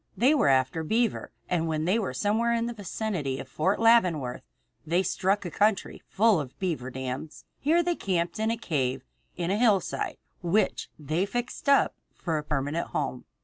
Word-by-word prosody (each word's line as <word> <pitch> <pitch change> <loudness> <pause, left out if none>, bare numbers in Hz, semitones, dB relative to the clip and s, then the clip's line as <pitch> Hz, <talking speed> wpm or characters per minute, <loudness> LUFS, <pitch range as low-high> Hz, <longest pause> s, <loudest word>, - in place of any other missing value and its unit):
They 255 +9 +5
were 295 - +3
after 130 +4 +2
beaver, 225 +6 0 0.2
and 165 -2 0
when 155 -1 -1
they 195 +6 +2
were 195 - -2
somewhere 225 - +1
in 230 0 0
the 240 - -3
vicinity 195 - -3
of - - -7
Fort 190 +6 0
Leavenworth 180 - +3 0.4
they 170 +4 +1
struck 195 +2 0
a 175 - -4
country 205 +2 +1
full 215 -2 +3
of 130 -4 -7
beaver 160 -9 -2
dams. 130 +3 -6
Here 330 +4 +3
they 350 +1 +1
camped 175 - -1
in 220 0 +1
a 230 - 0
cave 135 - -1 0.3
in 175 0 -1
the 200 - +1
hillside 210 -6 +1 0.2
which 180 +5 +1
they 155 +6 -1
fixed 245 +5 -3
up 280 - +5 0.2
for 160 -4 -2
a - - -6
permanent 150 +2 -2
home. 135 -4 -3
180 Hz, 180 wpm, -27 LUFS, 150-220 Hz, 0.4 s, They